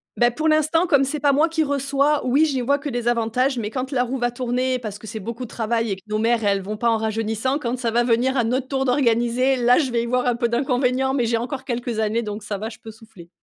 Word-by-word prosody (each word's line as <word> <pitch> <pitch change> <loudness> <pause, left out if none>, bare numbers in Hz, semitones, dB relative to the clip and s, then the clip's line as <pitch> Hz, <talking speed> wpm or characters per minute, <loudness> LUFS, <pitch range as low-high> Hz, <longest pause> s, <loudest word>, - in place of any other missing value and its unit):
Bah, 240 0 +3
pour 315 +5 -2
l'instant, 310 +3 +2
comme 280 -3 +4
c'est 290 +2 -2
pas 285 -1 +3
moi 300 +4 +3
qui 320 -1 0
reçois, 280 0 0
oui, 280 +5 +4
j'y 270 -4 -1
vois 280 +3 +1
que 285 - -5
des 240 -1 -3
avantages, 240 +2 +1
mais 210 -1 -3
quand 260 +4 -4
la 250 -2 +1
roue 260 +2 -3
va 240 -1 0
tourner, 250 +1 -1
parce 210 -3 -6
que 220 - -13
c'est 220 +1 -6
beaucoup 235 +5 -6
de - - -6
travail 230 -1 -1
et - - 0
que - - -16
nos 215 0 -1
mères, 230 0 +1
elles 200 -1 +1
vont 210 +2 -4
pas 235 +1 +1
en 225 - +2
rajeunissant. 225 +5 -1
Quand 245 -1 -2
ça 235 -2 -2
va 240 +1 +2
venir 245 +3 +1
à 240 - +2
notre 255 +3 -1
tour 270 -1 -1
d'organiser, 250 0 +2
là, 245 0 +4
je 270 -6 0
vais 235 -1 +1
y - - -3
voir 250 +1 0
un 245 -1 +2
peu 235 -1 0
d'inconvénients, 255 +1 +1
mais 245 -4 +1
j'ai 230 0 +1
encore 260 +3 -5
quelques 240 -2 -3
années, 220 +2 0
donc 210 0 -5
ça 205 -1 -4
va, 220 +3 -5
je 230 0 -13
peux 225 - -11
souffler. 215 -6 -16
245 Hz, 280 wpm, -22 LUFS, 225-265 Hz, -, comme